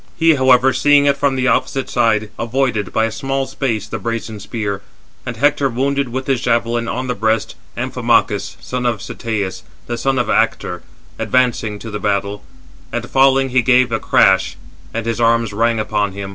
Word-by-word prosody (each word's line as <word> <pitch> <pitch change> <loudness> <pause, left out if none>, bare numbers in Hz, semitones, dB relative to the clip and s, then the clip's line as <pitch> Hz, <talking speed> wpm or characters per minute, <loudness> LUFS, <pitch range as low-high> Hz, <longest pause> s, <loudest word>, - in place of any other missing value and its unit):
He, 165 -1 +5
however, 130 -1 +4
seeing 145 -1 +4
it 140 -1 +3
from 140 -2 0
the 130 0 0
opposite 130 +2 0
side, 110 -3 +1
avoided, 115 -4 -1
by 110 - +1
a 115 - -2
small 135 +3 -2
space, 115 -7 -2
the 115 - -5
brazen 115 0 -4
spear; 100 -1 -4 0.5
and 120 -2 -4
[Hector] 145 +1 +2
wounded 140 +2 0
with 130 +2 -4
his 135 -3 0
javelin, 120 -1 0
on 125 +3 -3
the 125 - -1
breast, 110 0 0 0.2
Amphimachus, - - 0
son 125 -1 -3
of 115 -3 -1
Cteas, 100 -2 -4 0.2
the 120 0 -4
son 135 +2 0
of 125 - 0
Actor, - - 0 0.4
advancing 120 -4 +1
to 110 +1 -8
the 105 - -4
battle; 100 0 -2 0.5
and, 120 +1 -3
falling, 135 0 +4
he 130 0 +3
gave 125 0 +3
a 115 - 0
crash, 95 0 +3 0.3
and 115 0 -4
his 115 0 -2
arms 115 -2 +2
rang 115 +1 +1
upon 105 -2 -1
him. 100 0 -6
115 Hz, 180 wpm, -18 LUFS, 110-130 Hz, 0.5 s, He